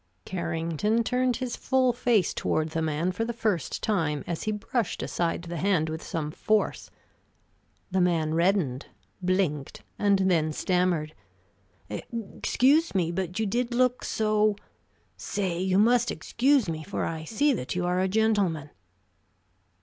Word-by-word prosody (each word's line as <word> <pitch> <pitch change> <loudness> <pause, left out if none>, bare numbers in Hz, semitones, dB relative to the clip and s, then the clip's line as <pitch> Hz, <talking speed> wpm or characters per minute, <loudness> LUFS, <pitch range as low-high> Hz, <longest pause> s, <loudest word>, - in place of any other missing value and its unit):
Carrington 170 +5 -1
turned 250 +1 +1
his 255 -1 -3
full 260 -2 +2
face 230 -6 +2
toward 155 0 0
the 165 - -1
man 160 +3 0
for 205 +5 -2
the 235 - -2
first 210 - -1
time 160 -9 0
as 170 - -3
he 215 - 0
brushed 215 +1 -2
aside 170 0 -1
the 170 0 -5
hand 170 -3 +1
with 160 +1 -4
some 150 -2 -4
force. 215 +6 0 1.0
The 190 0 +2
man 165 -3 +1
reddened, 170 -6 +1 0.3
blinked, 180 -6 -1 0.2
and 200 -1 +4
then 155 -3 +2
stammered: 180 -3 0 0.7
"Excuse 255 +6 0
me, 170 -3 +1
but 180 0 -3
you 220 - +1
did 240 +4 -1
look 250 0 +2
so 215 -1 +2 0.6
Say, 185 -4 -2
you 190 0 +1
must 240 +3 +4
excuse 265 -1 +2
me, 160 -1 -3
for 200 - -3
I 160 -1 -4
see 280 - +2
that 135 - -4
you 180 0 0
are 180 +1 +1
a 190 - +2
gentleman." 195 -8 +1
185 Hz, 145 wpm, -27 LUFS, 165-225 Hz, 1.0 s, and